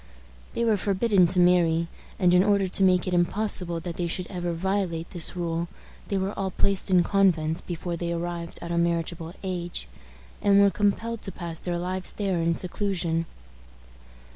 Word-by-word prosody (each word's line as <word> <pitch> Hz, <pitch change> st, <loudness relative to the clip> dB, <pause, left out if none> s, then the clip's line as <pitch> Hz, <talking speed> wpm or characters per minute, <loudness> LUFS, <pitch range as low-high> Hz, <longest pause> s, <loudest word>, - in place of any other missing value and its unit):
They 235 Hz, -, 0 dB
were 220 Hz, -2 st, +3 dB
forbidden 200 Hz, -1 st, +3 dB
to 180 Hz, -, +2 dB
marry, 170 Hz, -2 st, +4 dB, 0.3 s
and, 180 Hz, -2 st, +3 dB
in 180 Hz, +1 st, +6 dB
order 200 Hz, -1 st, +2 dB
to 190 Hz, +2 st, 0 dB
make 185 Hz, -1 st, +4 dB
it 185 Hz, -, -1 dB
impossible 175 Hz, -1 st, +1 dB
that 170 Hz, -2 st, -6 dB
they 175 Hz, -, -1 dB
should 180 Hz, +2 st, -3 dB
ever 175 Hz, -2 st, -2 dB
violate 175 Hz, -1 st, -2 dB
this 175 Hz, 0 st, +2 dB
rule, 170 Hz, -1 st, -2 dB, 0.4 s
they 200 Hz, -, -1 dB
were 190 Hz, +2 st, -1 dB
all 195 Hz, -1 st, -2 dB
placed 195 Hz, +1 st, 0 dB
in 180 Hz, -2 st, +5 dB
convents 170 Hz, -6 st, +2 dB
before 175 Hz, 0 st, -4 dB
they 170 Hz, 0 st, -3 dB
arrived 170 Hz, 0 st, -4 dB
at 170 Hz, -, -5 dB
a 170 Hz, -, +1 dB
marriageable 170 Hz, 0 st, -1 dB
age, 175 Hz, -, -4 dB, 0.5 s
and 200 Hz, 0 st, +5 dB
were 200 Hz, -1 st, +5 dB
compelled 215 Hz, +3 st, 0 dB
to 195 Hz, -, -3 dB
pass 170 Hz, -2 st, -5 dB
their 175 Hz, -1 st, -3 dB
lives 185 Hz, +2 st, -2 dB
there 195 Hz, -5 st, -1 dB
in 165 Hz, 0 st, +1 dB
seclusion. 175 Hz, -3 st, -1 dB
180 Hz, 175 wpm, -26 LUFS, 170-195 Hz, 0.5 s, in